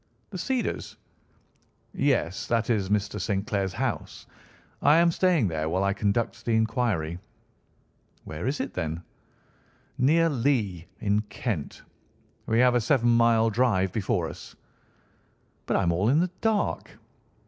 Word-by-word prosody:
"The 190 Hz, -, -5 dB
Cedars?" 260 Hz, +1 st, -2 dB, 1.0 s
"Yes; 90 Hz, +4 st, 0 dB
that 115 Hz, 0 st, +1 dB
is 100 Hz, -4 st, 0 dB
Mr. 105 Hz, 0 st, -1 dB
St. 100 Hz, -1 st, -1 dB
Clair's 100 Hz, -3 st, -1 dB
house. -, -, -4 dB, 0.6 s
I 150 Hz, +2 st, +5 dB
am 170 Hz, 0 st, +5 dB
staying 170 Hz, -, +2 dB
there 80 Hz, -2 st, -2 dB
while 95 Hz, +3 st, 0 dB
I 100 Hz, 0 st, +1 dB
conduct 115 Hz, +3 st, -1 dB
the 115 Hz, -, +1 dB
inquiry." 110 Hz, -8 st, 0 dB, 1.0 s
"Where 80 Hz, +9 st, -5 dB
is 140 Hz, +3 st, -1 dB
it, -, -, -5 dB
then?" 80 Hz, -1 st, -3 dB, 1.0 s
"Near 160 Hz, +6 st, +4 dB
Lee, 115 Hz, -, 0 dB
in 105 Hz, -1 st, +2 dB
Kent. 105 Hz, -, -4 dB, 0.6 s
We 110 Hz, -, +1 dB
have 125 Hz, -1 st, +5 dB
a 120 Hz, -, +2 dB
seven 120 Hz, 0 st, +2 dB
mile 115 Hz, -1 st, +4 dB
drive 105 Hz, -5 st, +2 dB
before 100 Hz, -4 st, -1 dB
us." -, -, -10 dB, 1.1 s
"But -, -, +1 dB
I -, -, +1 dB
am 85 Hz, -, +2 dB
all 95 Hz, +6 st, +1 dB
in 145 Hz, +5 st, +4 dB
the 180 Hz, +1 st, 0 dB
dark." 220 Hz, -2 st, -1 dB
110 Hz, 140 wpm, -26 LUFS, 95-125 Hz, 1.1 s, I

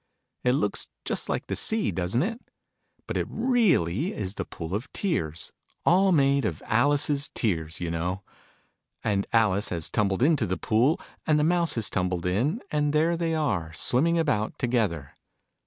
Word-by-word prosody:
It 125 Hz, -, +3 dB
looks 105 Hz, -7 st, 0 dB, 0.2 s
just -, -, -1 dB
like -, -, -1 dB
the -, -, -3 dB
sea, 220 Hz, -1 st, +1 dB
doesn't 95 Hz, -, 0 dB
it? 230 Hz, +5 st, -3 dB, 0.6 s
But -, -, -3 dB
it -, -, -1 dB
really 195 Hz, -, +1 dB
is 95 Hz, -2 st, -3 dB
the -, -, -4 dB
Pool 85 Hz, +1 st, -7 dB
of 115 Hz, +6 st, -3 dB
Tears 80 Hz, -, -2 dB, 0.3 s
all 190 Hz, +2 st, +5 dB
made 140 Hz, -4 st, +3 dB
of 90 Hz, -8 st, -3 dB
Alice's 145 Hz, +4 st, +2 dB
tears, 80 Hz, -7 st, -1 dB
you 85 Hz, -1 st, -3 dB
know! 90 Hz, +4 st, -2 dB, 0.8 s
And 100 Hz, -2 st, 0 dB
Alice 105 Hz, -2 st, +2 dB
has 85 Hz, -3 st, -3 dB
tumbled 100 Hz, +2 st, +1 dB
into 155 Hz, 0 st, +3 dB
the 95 Hz, -, -1 dB
Pool: 125 Hz, +7 st, +2 dB, 0.3 s
and 155 Hz, -1 st, +4 dB
the 150 Hz, -, +2 dB
Mouse 170 Hz, +1 st, +2 dB
has 115 Hz, -4 st, -1 dB
tumbled 90 Hz, -1 st, -1 dB
in: 125 Hz, -, 0 dB
and 150 Hz, -1 st, +1 dB
there 160 Hz, +3 st, +3 dB
they 165 Hz, -1 st, -1 dB
are, 100 Hz, -, -1 dB
swimming 160 Hz, -, +2 dB
about 145 Hz, -10 st, 0 dB
together. 105 Hz, -, -1 dB
120 Hz, 165 wpm, -26 LUFS, -, 0.8 s, all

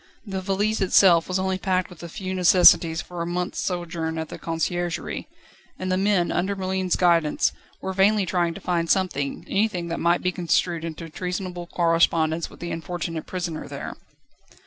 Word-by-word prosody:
The 195 Hz, -2 st, -4 dB
valise 200 Hz, +3 st, 0 dB
itself 180 Hz, -3 st, +5 dB
was 185 Hz, -, 0 dB
only 190 Hz, 0 st, -1 dB
packed 185 Hz, -2 st, 0 dB
with 175 Hz, -, -13 dB
the 170 Hz, -, -8 dB
few 190 Hz, +1 st, -5 dB
necessaries 175 Hz, -2 st, +5 dB
for 175 Hz, -1 st, -7 dB
a 170 Hz, -, -2 dB
month's 180 Hz, +1 st, -2 dB
sojourn 165 Hz, -3 st, -3 dB
at 160 Hz, -1 st, -4 dB
the -, -, -8 dB
Conciergerie; 170 Hz, +1 st, -3 dB, 0.5 s
and 185 Hz, 0 st, -3 dB
the -, -, +3 dB
men, 190 Hz, -2 st, +2 dB
under 190 Hz, +3 st, 0 dB
Merlin's 190 Hz, -1 st, -1 dB
guidance, 170 Hz, -4 st, +3 dB, 0.3 s
were 190 Hz, -, -3 dB
vainly 200 Hz, +1 st, +3 dB
trying 175 Hz, -2 st, 0 dB
to 195 Hz, -, -9 dB
find 170 Hz, -2 st, -1 dB
something, 180 Hz, -8 st, 0 dB
anything 195 Hz, -5 st, 0 dB
that 165 Hz, -, -3 dB
might 170 Hz, +1 st, +2 dB
be 180 Hz, -, +1 dB
construed 175 Hz, -1 st, 0 dB
into 165 Hz, 0 st, -6 dB
treasonable 180 Hz, +1 st, -5 dB
correspondence 165 Hz, -1 st, +2 dB
with -, -, -16 dB
the 175 Hz, -, -4 dB
unfortunate 165 Hz, -1 st, -4 dB
prisoner 175 Hz, -4 st, -4 dB
there. -, -, -6 dB
175 Hz, 170 wpm, -24 LUFS, 170-185 Hz, 0.5 s, itself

